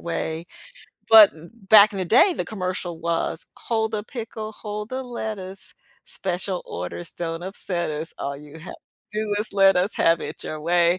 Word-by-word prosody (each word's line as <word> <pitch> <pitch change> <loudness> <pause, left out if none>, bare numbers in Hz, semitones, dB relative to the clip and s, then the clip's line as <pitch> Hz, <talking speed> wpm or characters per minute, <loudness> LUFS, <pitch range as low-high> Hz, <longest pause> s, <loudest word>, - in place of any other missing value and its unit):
way." 165 0 -3 0.6
But 220 -3 +10 0.4
back 215 0 +8
in 195 - -5
the 185 - 0
day, 235 - +5
the - - -2
commercial 185 -4 -4
was, 170 0 -1
"Hold 220 -1 -1
a 210 - -2
pickle, 220 -3 -6
hold 210 0 -6
the 260 +1 -3
lettuce, 215 -6 -6 0.3
special 185 0 -3
orders 90 - -6
don't 165 0 -4
upset 180 -3 -3
us. 155 +2 -5
All 140 0 -3
you 150 +2 -12
have 175 - -9
to - - -12 0.4
do 210 -1 -1
is 215 +1 -1
let 195 -1 +5
us 185 +4 +1
have 165 0 +3
it - - -6
your 155 -1 -5
way. 175 +2 +3
185 Hz, 175 wpm, -24 LUFS, 170-215 Hz, 0.6 s, But